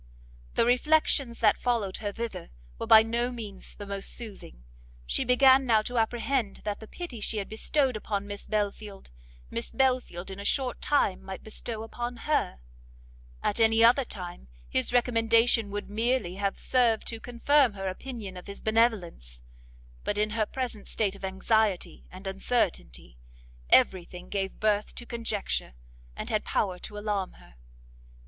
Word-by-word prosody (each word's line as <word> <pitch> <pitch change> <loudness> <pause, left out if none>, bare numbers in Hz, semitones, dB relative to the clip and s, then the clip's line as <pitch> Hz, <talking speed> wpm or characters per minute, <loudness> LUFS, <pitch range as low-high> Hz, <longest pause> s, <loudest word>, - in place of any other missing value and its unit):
The - - +4
reflections 255 -1 +2
that 210 -2 +4
followed 230 -6 0
her 205 -1 -3
thither 210 -5 -5 0.3
were - - -3
by 220 0 +9
no 235 +2 0
means 215 -5 -6
the 205 - -8
most 200 -1 -4
soothing; 200 - -7 0.4
she - - 0
began 260 +2 +6
now 220 -2 +4
to 245 +1 -1
apprehend 230 0 0
that 210 -1 -3
the 220 - -10
pity 280 -9 -7
she 220 - -1
had 200 - -2
bestowed 260 +4 0
upon 205 -1 -3
Miss 205 0 -7
Belfield, 205 - -3 0.4
Miss 115 - -3
Belfield 250 -9 0
in 190 - -7
a - - -5
short 255 +3 0
time 285 -10 +2
might 190 -1 -8
bestow 220 0 -5
upon 240 +2 -5
her; 290 - 0 0.8
at 210 - 0
any 225 0 +5
other 245 +4 +6
time, 180 - -8 0.2
his 130 - 0
recommendation 230 -2 +3
would 205 0 -4
merely 225 -2 0
have 200 0 -1
served 235 -4 +2
to 225 - -4
confirm 245 +1 +3
her 195 -1 -4
opinion 205 0 -6
of 180 - -10
his 200 - -7
benevolence, 190 - 0 0.6
but 205 - -1
in 210 0 +1
her 215 -1 0
present 250 -5 -4
state 205 -3 0
of 200 - -14
anxiety 190 +1 0
and 185 +2 -11
uncertainty, - - -2 0.5
every 185 -2 +5
thing 180 +1 -11
gave 195 -1 -3
birth 210 -1 +1
to 240 - -6
conjecture, 225 - -3 0.4
and - - -5
had 215 -1 +1
power 185 -3 -1
to 210 - -8
alarm 205 -3 -2
her. - - -18
215 Hz, 160 wpm, -28 LUFS, 195-240 Hz, 0.8 s, by